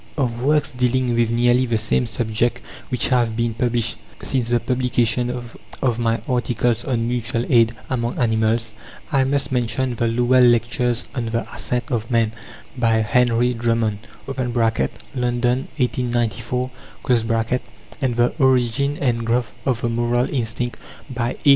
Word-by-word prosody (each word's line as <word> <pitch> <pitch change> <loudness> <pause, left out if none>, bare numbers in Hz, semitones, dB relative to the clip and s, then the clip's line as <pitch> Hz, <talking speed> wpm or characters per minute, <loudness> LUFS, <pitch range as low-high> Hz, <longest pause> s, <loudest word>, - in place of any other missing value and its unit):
Of 120 -4 -1
works 150 +2 +2
dealing 125 -1 +1
with 115 -1 +2
nearly 120 +2 +3
the 115 -1 +1
same 110 +2 +1
subject, 115 +1 -1 0.3
which 125 - 0
have 120 -4 +2
been 115 -1 0
published 120 0 -1 0.3
since 125 -3 -1
the 120 0 +3
publication 125 -1 0
of 120 0 -4
my 115 -1 +1
articles 120 -2 0
on 120 -4 -1
Mutual 120 -1 -1
Aid 115 -2 +4
among 120 -2 -2
Animals, 110 -1 +1 0.4
I 135 -3 +3
must 140 0 0
mention 125 +1 0
The 115 0 0
Lowell 125 +2 +3
Lectures 120 0 +2
on 120 -4 -2
the 115 +1 -2
Ascent 125 0 0
of 115 -2 -1
Man, 115 -3 +2 0.4
by 115 -3 +2
Henry 120 +2 +2
Drummond 115 -3 0 0.3
(London, 120 - -1
1894), 125 -1 -1 1.3
and 130 -3 0
The 120 +1 +2
Origin 130 +2 +2
and 120 -4 0
Growth 120 +1 0 0.2
of 125 -3 +1
the 120 - 0
Moral 120 +1 +1
Instinct, 120 -1 -2 0.3
by 125 -1 -2
A. - - +6
120 Hz, 140 wpm, -21 LUFS, 115-125 Hz, 1.3 s, A